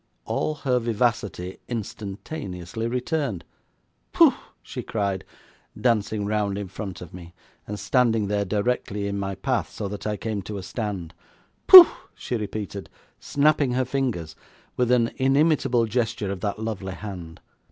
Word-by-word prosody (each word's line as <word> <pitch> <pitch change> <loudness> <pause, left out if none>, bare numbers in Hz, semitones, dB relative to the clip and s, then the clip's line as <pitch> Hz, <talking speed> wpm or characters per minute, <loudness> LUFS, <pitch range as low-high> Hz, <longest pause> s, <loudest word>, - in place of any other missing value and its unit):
All 155 - -1
her 130 -4 0
vivacity 110 -6 -1
instantaneously 105 - -5
returned. 125 - -2 0.7
'Pooh!' - - +6 0.3
she - - -6
cried, 100 -3 -2 0.6
dancing 110 -3 +1
round 105 -1 -1
in 100 -1 -4
front 95 -2 -7
of 90 - -10
me, 85 -1 -11 0.3
and 105 0 -5
standing 115 -5 +2
there 100 0 0
directly 105 0 -1
in 100 0 -2
my 95 0 -3
path, 120 +7 -1
so 105 - -4
that 105 +1 -5
I 105 -1 -1
came 110 -2 -3
to 105 +2 -6
a 95 - -6
stand. 95 -6 -4 0.5
'Pooh!' 370 -2 +14 0.3
she 125 - -4
repeated, 105 -2 -5 0.3
snapping 145 -2 +2
her 130 +1 +1
fingers, 120 - -2 0.4
with 125 -1 +1
an 120 -2 +3
inimitable 135 -3 +3
gesture 110 -3 -1
of 100 - -4
that 100 +1 -2
lovely 105 -4 -4
hand. 90 -4 -8
105 Hz, 140 wpm, -24 LUFS, 100-125 Hz, 0.7 s, Pooh